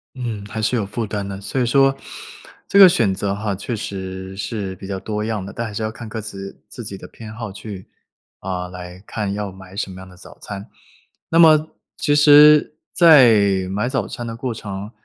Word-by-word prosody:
嗯， 115 Hz, -5 st, -5 dB
还 110 Hz, +1 st, -5 dB
是 110 Hz, +3 st, +1 dB
有 110 Hz, -, 0 dB
负 110 Hz, +3 st, -4 dB
担 100 Hz, -1 st, -4 dB
的。 100 Hz, 0 st, -6 dB
所 105 Hz, +6 st, -3 dB
以 -, -, +2 dB
说 135 Hz, +2 st, +3 dB, 0.7 s
这 200 Hz, -, +3 dB
个 195 Hz, -2 st, +11 dB
选 115 Hz, -, +2 dB
择 100 Hz, +1 st, -2 dB
哈， 105 Hz, 0 st, -3 dB
确 100 Hz, +5 st, -5 dB
实 95 Hz, -2 st, -6 dB
是 100 Hz, -2 st, -4 dB
比 95 Hz, -, -10 dB
较 95 Hz, -1 st, -4 dB
多 105 Hz, +2 st, -4 dB
样 110 Hz, -3 st, -3 dB
的。 100 Hz, -, -8 dB
但 115 Hz, -, -4 dB
还 110 Hz, -, -7 dB
是 105 Hz, -, -4 dB
要 110 Hz, -, -1 dB
看 115 Hz, 0 st, -9 dB
各 110 Hz, +1 st, -5 dB
自 100 Hz, -2 st, -8 dB
自 120 Hz, -, -9 dB
己 100 Hz, -2 st, -7 dB
的 -, -, -11 dB
偏 110 Hz, -1 st, -11 dB
好， 115 Hz, -2 st, -6 dB
去 100 Hz, -1 st, -9 dB, 0.5 s
啊， 90 Hz, -1 st, -4 dB
来 90 Hz, 0 st, -10 dB
看 105 Hz, -3 st, -3 dB
要 100 Hz, 0 st, -4 dB
买 95 Hz, 0 st, -14 dB
什 100 Hz, -1 st, -3 dB
么 95 Hz, 0 st, -10 dB
样 95 Hz, -, -11 dB
的 90 Hz, -, -16 dB
早 90 Hz, -, -15 dB
餐。 100 Hz, -1 st, -8 dB, 0.6 s
那 165 Hz, -, +3 dB
么 155 Hz, -2 st, +6 dB, 0.3 s
其 145 Hz, -, +1 dB
实 150 Hz, +1 st, +7 dB, 0.2 s
在 110 Hz, -, +5 dB
买 105 Hz, +5 st, -1 dB
早 135 Hz, +1 st, -1 dB
餐 120 Hz, -, -7 dB
的 115 Hz, 0 st, -6 dB
过 125 Hz, +1 st, -3 dB
程 100 Hz, -1 st, -7 dB
105 Hz, 230 characters per minute, -20 LUFS, 95-120 Hz, 0.7 s, 个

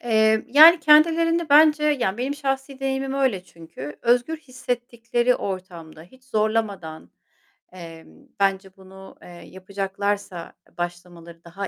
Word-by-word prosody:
Emm, 220 Hz, -2 st, +1 dB
yani, 320 Hz, +5 st, +7 dB
kendilerini 330 Hz, +2 st, +3 dB
bence, 300 Hz, +1 st, +5 dB
yani, 250 Hz, -9 st, 0 dB
benim 265 Hz, +3 st, -3 dB
şahsi 270 Hz, -1 st, -4 dB
deneyimim 270 Hz, 0 st, -3 dB
öyle 255 Hz, -10 st, -1 dB
çünkü, 160 Hz, -5 st, -11 dB
özgür 245 Hz, +6 st, +1 dB
hissettikleri 245 Hz, -3 st, -3 dB
ortamda, 175 Hz, -5 st, -8 dB
hiç 255 Hz, +9 st, -21 dB
zorlamadan, 210 Hz, -, -3 dB, 0.6 s
emm, 170 Hz, -, -14 dB
bence 195 Hz, -1 st, -1 dB
bunu, 190 Hz, 0 st, -15 dB
eee, -, -, -15 dB
yapacaklarsa 195 Hz, 0 st, -6 dB, 0.2 s
başlamaları 175 Hz, -1 st, -8 dB
daha 190 Hz, +3 st, -7 dB
220 Hz, 115 wpm, -22 LUFS, 185-270 Hz, 0.6 s, yani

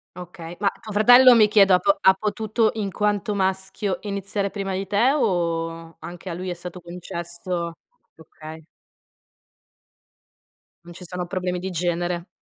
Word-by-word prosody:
Okay, 175 Hz, -1 st, -9 dB
ma 200 Hz, -1 st, +2 dB
tuo 215 Hz, -, -9 dB
fratello 245 Hz, +4 st, +7 dB
mi 215 Hz, -2 st, +6 dB
chiedo 200 Hz, -3 st, +5 dB
ha 180 Hz, -, +5 dB
po 300 Hz, -, +2 dB
ha 190 Hz, -, +6 dB
potuto, 215 Hz, +2 st, 0 dB
in 200 Hz, -3 st, -3 dB
quanto 210 Hz, +1 st, -1 dB
maschio, 190 Hz, 0 st, -2 dB
iniziare 200 Hz, -1 st, -3 dB
prima 195 Hz, -2 st, -4 dB
di 195 Hz, +1 st, -3 dB
te 210 Hz, +7 st, +2 dB
o 165 Hz, -, -1 dB
anche 175 Hz, +3 st, -8 dB
a -, -, -4 dB
lui 185 Hz, +1 st, -5 dB
è -, -, -2 dB
stato 180 Hz, +1 st, -9 dB
concesso 170 Hz, 0 st, -6 dB, 0.4 s
okay. 160 Hz, 0 st, -12 dB, 2.2 s
Non 175 Hz, -, -11 dB
ci 180 Hz, -, -11 dB
sono 180 Hz, 0 st, -5 dB
problemi 180 Hz, -1 st, -3 dB
di 190 Hz, +1 st, -4 dB
genere. 175 Hz, +1 st, -2 dB
185 Hz, 150 wpm, -23 LUFS, 175-205 Hz, 2.2 s, fratello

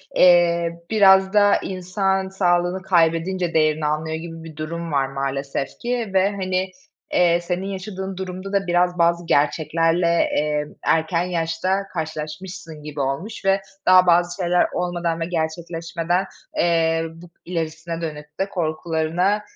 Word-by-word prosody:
eee, 170 Hz, -1 st, +4 dB
biraz 190 Hz, -2 st, +5 dB
da 205 Hz, -1 st, +5 dB
insan, 190 Hz, +1 st, -1 dB
sağlığını 180 Hz, -1 st, +1 dB
kaybedince 175 Hz, 0 st, +1 dB
değerini 155 Hz, -1 st, +2 dB
anlıyor 155 Hz, +1 st, -1 dB
gibi 165 Hz, 0 st, -7 dB
bir 160 Hz, -2 st, -10 dB
durum 165 Hz, +1 st, -5 dB
var 135 Hz, -2 st, +1 dB
maalesef 135 Hz, 0 st, -3 dB
ki 240 Hz, -3 st, -2 dB
ve, 190 Hz, +1 st, +4 dB
hani, 185 Hz, -1 st, -2 dB, 0.4 s
eee, 175 Hz, -1 st, +4 dB
senin 180 Hz, +2 st, -3 dB
yaşadığın 190 Hz, -1 st, -5 dB
durumda 190 Hz, +1 st, -6 dB
da 195 Hz, -2 st, +1 dB
biraz 175 Hz, 0 st, +2 dB
bazı 170 Hz, 0 st, +2 dB
gerçeklerle, 165 Hz, +3 st, +2 dB, 0.3 s
eee, 150 Hz, 0 st, 0 dB, 0.2 s
erken 165 Hz, +2 st, +1 dB
yaşta 180 Hz, +3 st, -1 dB
karşılaşmışsın 160 Hz, 0 st, -6 dB
gibi 150 Hz, -1 st, -7 dB
olmuş 160 Hz, +12 st, -3 dB
ve 195 Hz, 0 st, +3 dB, 0.2 s
daha 185 Hz, -1 st, +6 dB
bazı 175 Hz, 0 st, +3 dB
şeyler 175 Hz, +1 st, +3 dB
olmadan 175 Hz, -2 st, -1 dB
ve 165 Hz, -, -1 dB
gerçekleşmeden, 170 Hz, +2 st, -2 dB, 0.3 s
eee, 165 Hz, -1 st, +2 dB
bu 170 Hz, +1 st, -14 dB, 0.2 s
ilerisine 165 Hz, 0 st, -4 dB
dönük 150 Hz, -1 st, -7 dB
de 195 Hz, +1 st, 0 dB
korkularına, 170 Hz, +3 st, 0 dB
170 Hz, 130 wpm, -22 LUFS, 160-185 Hz, 0.4 s, daha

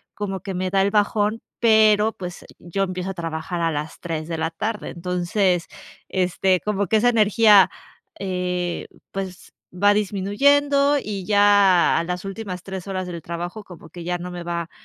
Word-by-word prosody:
como 195 Hz, -2 st, -4 dB
que 195 Hz, +1 st, -5 dB
me 185 Hz, +1 st, -1 dB
da 195 Hz, 0 st, +3 dB
el 200 Hz, +1 st, +1 dB
bajón, 210 Hz, +1 st, +1 dB, 0.2 s
pero 220 Hz, -1 st, +5 dB
pues 180 Hz, -2 st, -8 dB
el -, -, -16 dB
yo 175 Hz, +3 st, -2 dB
empiezo 185 Hz, 0 st, -3 dB
a -, -, -6 dB
trabajar 165 Hz, 0 st, -4 dB
a 165 Hz, -1 st, +1 dB
las 150 Hz, +1 st, -5 dB
3 160 Hz, -2 st, -4 dB
de 165 Hz, -1 st, -3 dB
la 160 Hz, 0 st, -1 dB
tarde. 210 Hz, +6 st, -4 dB
Entonces, 180 Hz, +1 st, 0 dB, 0.4 s
este, 185 Hz, 0 st, +1 dB
como 205 Hz, 0 st, -1 dB
que 220 Hz, -, +3 dB
esa 240 Hz, +3 st, +4 dB
energía, 215 Hz, -3 st, +5 dB, 0.5 s
eh, 180 Hz, -2 st, -2 dB, 0.2 s
pues 190 Hz, -2 st, -7 dB, 0.2 s
va 205 Hz, +3 st, +4 dB
disminuyendo, 280 Hz, +9 st, +2 dB
y 200 Hz, -3 st, -5 dB
ya 205 Hz, -3 st, +4 dB
a -, -, +1 dB
las 180 Hz, +2 st, -4 dB
últimas 195 Hz, -2 st, -6 dB
3 190 Hz, 0 st, -7 dB
horas 185 Hz, -2 st, -3 dB
del 170 Hz, -2 st, -6 dB
trabajo 175 Hz, +5 st, -6 dB
como 175 Hz, -4 st, -13 dB
que 175 Hz, 0 st, -9 dB
ya 175 Hz, +1 st, -2 dB
no 180 Hz, +1 st, -7 dB
me 175 Hz, -1 st, -6 dB
va 170 Hz, -1 st, -3 dB
190 Hz, 180 wpm, -22 LUFS, 175-205 Hz, 0.5 s, pero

